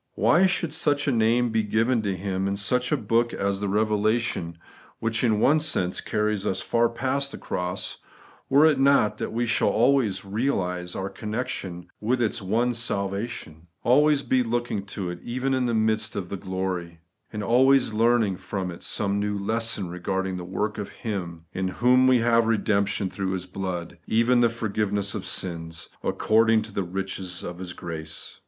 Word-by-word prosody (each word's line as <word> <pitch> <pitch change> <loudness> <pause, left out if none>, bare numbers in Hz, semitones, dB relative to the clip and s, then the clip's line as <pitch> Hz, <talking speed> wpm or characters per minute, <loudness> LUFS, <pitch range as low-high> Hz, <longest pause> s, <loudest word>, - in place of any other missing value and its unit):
Why 155 - +4
should 170 -4 -1
such 145 -2 +1
a - - +3
name 120 +1 +2
be 110 0 +2
given 115 +3 +1
to 100 -3 -2
Him 95 0 -2
in 100 0 -1
such 125 +5 +1
a 150 - +3
book 115 +1 +1
as 100 0 -1
the 100 - -2
Eevelation, 105 -3 0 0.4
which 115 +2 -1
in 110 -3 +3
one 150 +7 +4
sense 95 - 0
carries 105 -1 -1
us 95 -2 -1
far 115 +3 +2
past 135 +3 -1
the - - -7
cross, 90 0 -3 0.5
were 145 +3 +6
it 155 -4 +4
not 135 -6 +3
that - - -3
we 120 +2 0
shall 115 - +2
always 120 -4 +2
realize 95 -5 -1
our 95 - -3
connection 100 -5 -4
with 120 +4 0
its 115 -1 0
one 115 +6 +1
salva 100 -2 -1
tion; 80 -9 -10 0.2
always 145 +3 +4
be 130 - +2
looking 120 -4 -2
to 95 -2 -4
it 90 - -7
even 130 +3 -2
in 130 -1 +1
the 120 - 0
midst 110 0 +1
of 95 -3 -4
the - - -3
glory; 95 -3 -4 0.3
and 105 -1 -4
always 130 +2 +4
learning 115 -3 +2
from 95 -1 -4
it 85 - -10
some 100 -1 -1
new 105 0 -1
lesson 110 -1 -1
regarding 95 +2 -2
the 90 - -6
work 105 +4 -3
of 100 - -4
Him 85 -7 -5
' - - -46
in 95 0 -1
whom 125 +6 +4
we 130 -1 +6
have 115 -1 +3
redemption 100 -3 +1
through 95 0 -3
His 95 -1 -3
blood, 90 -2 -5
even 120 +2 +3
the 120 - +5
for 115 -1 -4
giveness 100 -1 0
of - - -5
sins, 80 -3 -4
according 110 0 +3
to 110 -2 -10
the 100 - -1
riches 95 0 -4
of 90 0 -6
His 90 -1 -6
grace 80 -2 -4
105 Hz, 185 wpm, -25 LUFS, 95-120 Hz, 0.5 s, were